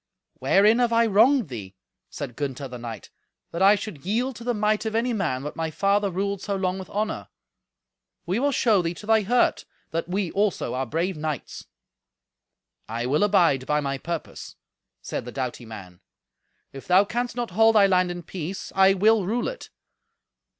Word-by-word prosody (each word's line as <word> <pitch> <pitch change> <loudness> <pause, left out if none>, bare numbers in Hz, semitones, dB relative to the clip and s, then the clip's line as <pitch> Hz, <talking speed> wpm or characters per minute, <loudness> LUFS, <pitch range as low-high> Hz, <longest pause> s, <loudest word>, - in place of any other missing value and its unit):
"Wherein 210 +4 +4
have 240 -1 +2
I 230 0 +4
wronged 230 - +4
thee," 100 -6 -8 0.3
said 135 -5 -7
Gunther 140 0 -4
the 125 -1 -9
knight, 115 -3 -8 0.4
"that 170 - -4
I 200 +2 +7
should 200 -8 -7
yield 240 +7 -1
to 235 - -10
the 245 0 -1
might 210 0 +1
of 220 - -3
any 240 +2 +1
man 155 - -1
what 150 - -6
my 165 0 -2
father 200 +4 +1
ruled 195 +1 -2
so 200 -1 -2
long 190 0 -1
with 190 - -9
honour? 215 +1 -3 1.0
We 185 +6 0
will 285 +2 +1
show 220 -7 +3
thee 170 0 -3
to 210 - -11
thy 220 0 +4
hurt 240 +5 +2 0.3
that 165 +1 -3
we 185 -1 -1
also 205 -1 0
are 130 0 -2
brave 170 +6 -2
knights." 150 -3 -5 1.2
"I 115 +2 -3
will 140 +4 +1
abide 170 -10 +3
by 150 0 +2
my 140 -2 -3
purpose," 170 +1 -6 0.5
said - - -4
the 125 - -8
doughty 125 -3 -5
man. 95 -5 -11 0.7
"If 135 - -10
thou 185 +3 +5
canst 240 +2 -3
not 240 -4 -3
hold 225 +4 +4
they 200 -2 +6
land 185 -1 +2
in 175 0 -6
peace, 180 +2 -6
I 195 0 +5
will 210 0 +3
rule 235 +4 -1
it. - - -7
190 Hz, 185 wpm, -25 LUFS, 150-215 Hz, 1.2 s, I